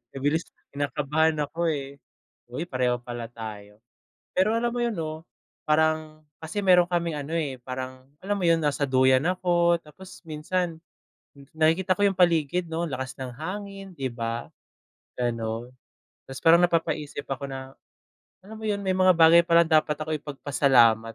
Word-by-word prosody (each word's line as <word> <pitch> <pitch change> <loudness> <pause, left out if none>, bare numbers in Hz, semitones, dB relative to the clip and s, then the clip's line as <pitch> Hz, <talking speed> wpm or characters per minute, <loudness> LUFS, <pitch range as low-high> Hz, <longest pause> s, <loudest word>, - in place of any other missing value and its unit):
Mabilis 145 +5 0 0.3
kinakabahan 150 +2 0
ako, 165 +3 -1 0.8
hoy, 155 +7 -3
pareho 125 -3 0
pala 120 -1 -7
tayo. 105 -2 -9 0.6
Pero 190 +4 +3
alam 230 +1 +1
mo 235 - -5
'yon, 235 - 0
'no, 160 -2 -5 0.4
parang 155 0 +1 0.2
kasi 160 +6 -4
meron 180 -2 +5
kaming 170 -3 -1
ano, 145 +2 -6
eh, 150 -6 -1
parang, 130 0 -6 0.2
alam 205 +2 -2
mo 190 - -3
'yon, 165 -1 +4
nasa 145 -1 0
duyan 130 +1 +3
ako 175 -1 +2
tapos 175 +5 -14
minsan, 165 +2 -2 0.6
n 140 - -16
nakikita 165 +4 +2
ko 205 - 0
yung 195 - -1
paligid, 170 0 +2
'no, 165 +1 -3
lakas 130 -5 -4
ng 130 -2 -6
hangin, 195 +2 -7
'di 135 -4 -3
ba, 115 0 -4 0.7
gano'n. 115 -1 -2 0.6
Tas 135 - -8
parang 170 +2 +5
napapaisip 155 -4 -1
ako 140 +1 -5
na, 135 0 -8 0.7
alam 215 +3 -11
mo 220 - -6
'yon, 200 -1 -1
may 190 -1 0
mga 185 -1 +5
bagay 165 +1 +7
palang 170 -1 +4
dapat 155 -1 +3
ako 155 +1 -5
ipagpasalamat, 130 -6 +2
155 Hz, 155 wpm, -26 LUFS, 130-175 Hz, 0.8 s, bagay